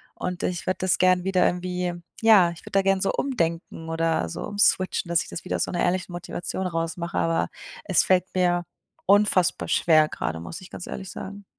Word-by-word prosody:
Und 180 -1 -4
ich 180 -1 -2
würde 185 - 0
das 185 -1 +2
gerne 185 -1 +3
wieder 190 -1 +3
irgendwie 180 0 -1 0.3
ja, 215 -6 +6
ich 170 - -11
würde - - -12
da 195 - +3
gerne 195 0 +2
so 195 - +1
umdenken 165 -9 -2
oder 165 - 0
so - - -6
umswitchen, 185 -3 +1
dass 170 0 +3
ich - - -7
das - - -7
wieder 185 - -2
aus - - -1
einer 175 - -2
ehrlichen 180 0 0
Motivation 175 +2 -4
raus 165 -2 -2
mache, 170 0 -4
aber 165 0 +1 0.3
es 190 -5 +3
fällt 185 -1 +3
mir 175 -1 +2 0.4
unfassbar 200 -3 +3
schwer 155 -2 +4
gerade, 80 - -4
muss 85 0 -8
ich 185 - -12
ganz - - -8
ehrlich 190 -2 -6
sagen. 200 +1 -8
180 Hz, 200 wpm, -25 LUFS, 165-185 Hz, 0.4 s, ja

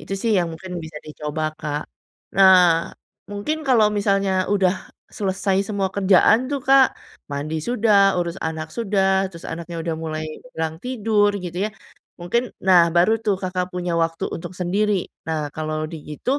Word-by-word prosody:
Itu - - -8
sih 230 - +1
yang 175 -2 0
mungkin 185 +2 -9
bisa 155 -1 -10
dicoba, 150 0 -5 0.2
Kak. 150 0 -3 0.5
Nah, 180 -4 +6 0.4
mungkin 205 +11 -2
kalau 225 -4 +5
misalnya 195 -1 +1 0.2
udah 190 -3 +3 0.4
selesai 190 -1 -1
semua 200 -2 -1
kerjaan 200 +2 +5
tuh 280 -2 -1
Kak, 270 0 +7 0.4
mandi 145 +3 -3
sudah, 205 -5 +4
urus 170 +1 -2
anak 160 -1 -3
sudah, 195 -3 +1
terus 170 -3 -12
anaknya 170 +1 -6
udah 165 - -1
mulai 155 0 -3 0.3
kurang 160 -1 -2
tidur 220 -4 +1
gitu 180 -2 -6
ya, - - -6 0.5
mungkin 235 +8 -1 0.2
nah 180 -3 +6
baru 200 +6 +4
tuh 210 -3 +1
Kakak 180 0 -2
punya 180 -1 -2
waktu 165 0 -1
untuk 180 - -6
sendiri. 195 +2 0 0.2
Nah 155 -2 -2
kalau 155 0 -3
begitu, 160 - -3
185 Hz, 155 wpm, -22 LUFS, 165-205 Hz, 0.5 s, Kak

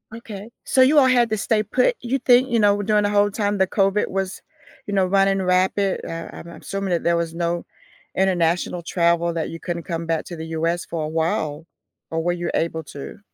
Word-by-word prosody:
Okay. 215 -2 -9
So 260 - +3
you 275 +4 +5
all 265 - +5
had 245 -2 +3
to 220 - +1
stay 215 +1 +1
put. 255 - +2
You 250 +3 -1
think 250 +1 +4
you 235 -1 +2
know, 205 -1 +3
during 210 0 +2
the 205 - +1
whole 205 0 +3
time 205 0 -1
the 190 0 +2
COVID 195 +1 +1
was, 195 0 -3 0.4
you 205 - -5
know, 190 -2 +3
running 195 +1 +2
rampant, 185 +1 +1
uh, 165 0 -6
I'm - - -10
I'm 170 - -11
assuming 195 -1 -3
that 170 - 0
there 170 0 +2
was 165 -1 -2
no 170 0 -2 0.5
international 175 -2 +1
travel 170 0 +1
that 165 -1 -2
you 165 - -7
couldn't 170 -1 -4
come 165 -1 -4
back 165 -1 -1
to 175 - -7
the 160 - -6
US 165 +2 -1
for 165 -2 -4
a - - -2
while, 160 -1 -1 0.4
or 165 0 -2
were 175 - +1
you 175 -1 -3
able 160 -1 -1
to? 140 +6 -9
185 Hz, 220 wpm, -22 LUFS, 170-205 Hz, 0.5 s, you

